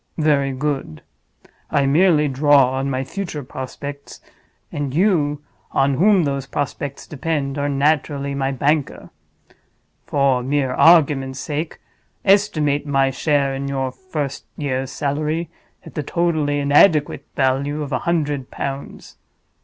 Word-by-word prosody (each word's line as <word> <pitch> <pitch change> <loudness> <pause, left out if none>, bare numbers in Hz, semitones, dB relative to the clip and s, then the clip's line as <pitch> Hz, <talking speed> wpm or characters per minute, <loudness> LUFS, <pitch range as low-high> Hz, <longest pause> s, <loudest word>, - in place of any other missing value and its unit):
Very 145 -3 +2
good. 135 - -3 0.7
I 140 - +2
merely 150 +1 +4
draw 140 -1 +4
on 135 +1 -2
my 130 0 -1
future 155 0 -5
prospects; 140 +2 -8 0.5
and 145 -2 -3
you, 150 -6 +1 0.3
on 135 +1 +2
whom 190 +5 +4
those 140 -2 -2
prospects 145 -1 -4
depend, 145 -2 -2
are 145 0 0
naturally 140 0 0
my 135 -1 -1
banker. 145 +2 -1 1.0
For 140 -3 +2
mere 135 0 0
argument's 140 -5 +4
sake, 155 +3 -4 0.5
estimate 155 -8 +2
my 135 -1 +2
share 140 -1 +1
in 135 +1 -4
your 135 -1 -2
first 150 -4 -5
year's 135 -3 -2
salary 155 +4 -2 0.3
at - - -11
the 150 - -2
totally 155 -2 0
inadequate 145 +2 +3
value 140 +3 0
of 145 - -7
a - - 0
hundred 150 -6 -1
pounds. 140 0 -6
145 Hz, 125 wpm, -20 LUFS, 135-150 Hz, 1.0 s, merely